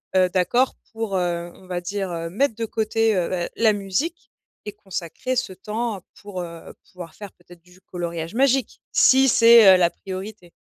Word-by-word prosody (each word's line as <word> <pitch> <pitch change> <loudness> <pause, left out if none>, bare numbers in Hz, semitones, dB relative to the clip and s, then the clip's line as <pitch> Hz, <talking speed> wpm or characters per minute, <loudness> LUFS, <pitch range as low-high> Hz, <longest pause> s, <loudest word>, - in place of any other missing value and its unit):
heu, 185 -1 +4
d'accord 190 +9 +1 0.2
pour, 220 -4 -2
heu, 175 -1 -2
on 185 - -18
va 175 -1 -3
dire, 195 +1 -4
heu, 165 0 -4
mettre 225 +5 0
de 230 - -3
côté, 225 0 0
heu, 175 - 0
ben, 175 -2 -2
la 220 -2 +4
musique 205 - -3 0.3
et 210 - -6
consacrer 205 +5 -5
ce 190 - -2
temps 210 +2 -4 0.2
pour, 200 -3 -6
heu, 170 -1 -9 0.2
pouvoir 175 -3 -10
faire 205 -2 -10
peut-être 175 -1 -19
du 180 +1 -21
coloriage 170 0 -6
magique 270 0 +1
si 265 0 +5
c'est, 230 -4 +8
heu, - - +4
la 175 -2 +3
priorité? 190 0 -9
195 Hz, 180 wpm, -22 LUFS, 175-225 Hz, 0.3 s, c'est